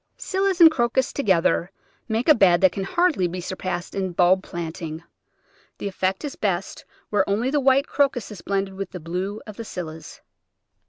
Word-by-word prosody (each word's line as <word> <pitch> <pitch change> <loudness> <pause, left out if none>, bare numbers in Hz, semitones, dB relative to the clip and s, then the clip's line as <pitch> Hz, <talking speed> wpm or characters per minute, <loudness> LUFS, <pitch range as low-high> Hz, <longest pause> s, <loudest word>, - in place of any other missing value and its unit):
Scillas 385 -1 -1
and 330 -2 +9
Crocus 250 -1 0
together 185 -7 +2 0.4
make 225 +2 -1
a 310 - +9
bed 185 -8 +4
that 190 -2 +5
can 195 - -4
hardly 340 - +2
be 180 +2 -5
surpassed 180 0 -4
in 190 -2 -2
bulb 180 +2 +4
planting. 165 -2 -6 0.7
The - - -4
effect 190 +3 -2
is 285 - -5
best 195 -2 -3 0.3
where 205 -2 +2
only 225 +6 0
the 295 - +2
white 270 +1 +3
Crocus 270 -8 0
is 205 - -9
blended 195 -1 -2
with 195 +1 -5
the 180 - -8
blue 180 +6 -4
of 215 -2 -10
the 230 - -5
Scillas. 160 -6 -8
195 Hz, 175 wpm, -23 LUFS, 180-250 Hz, 0.7 s, and